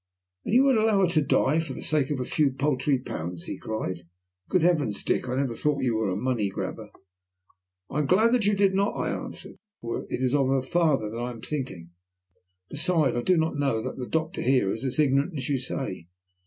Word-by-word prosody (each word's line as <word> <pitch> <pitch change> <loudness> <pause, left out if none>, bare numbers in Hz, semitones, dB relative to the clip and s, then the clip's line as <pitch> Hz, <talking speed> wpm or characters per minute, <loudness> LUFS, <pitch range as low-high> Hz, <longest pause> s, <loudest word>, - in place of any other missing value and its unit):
"And 220 - 0
you 255 - +7
would 270 -4 +4
allow 215 -2 +3
her 180 -2 +3
to 155 -3 +3
die 145 +1 +2
for 165 - -3
the - - -7
sake 150 -4 +1
of 145 -3 -1
a 125 - -2
few 150 +1 +2
paltry 135 0 +1
pounds?" 85 -8 -6
he - - -6
cried. 90 -6 -4 0.4
"Good 185 - +2
heavens, 150 - +1
Dick, 125 - 0
I 125 - -1
never 135 -3 0
thought 140 +2 0
you 120 -3 +1
were 110 -2 0
a 90 - -1
money 115 -2 0
grabber." - - -5 1.0
"I 150 - -3
am 150 - 0
glad 220 - +4
you 205 0 +3
did 195 -1 +3
not," 200 +2 +1
I - - -1
answered. - - -6 0.3
"It 115 +2 -3
is 130 0 +1
of 140 -2 +3
her 135 -1 +1
father 135 -9 +1
I 120 +1 -3
am 115 -2 -8
thinking. 115 - -5 0.8
Besides, 150 -3 +1
I 120 - 0
do 180 +6 +3
not 160 -2 0
know 135 -6 +1
that 130 - -5
the 125 -2 -5
doctor 160 +2 -1
here 125 -7 +2
is 110 - -4
as 130 - -2
ignorant 145 +3 +2
as 130 0 -3
you 140 -2 +1
say. 125 -9 -4
135 Hz, 215 wpm, -26 LUFS, 120-160 Hz, 1.0 s, you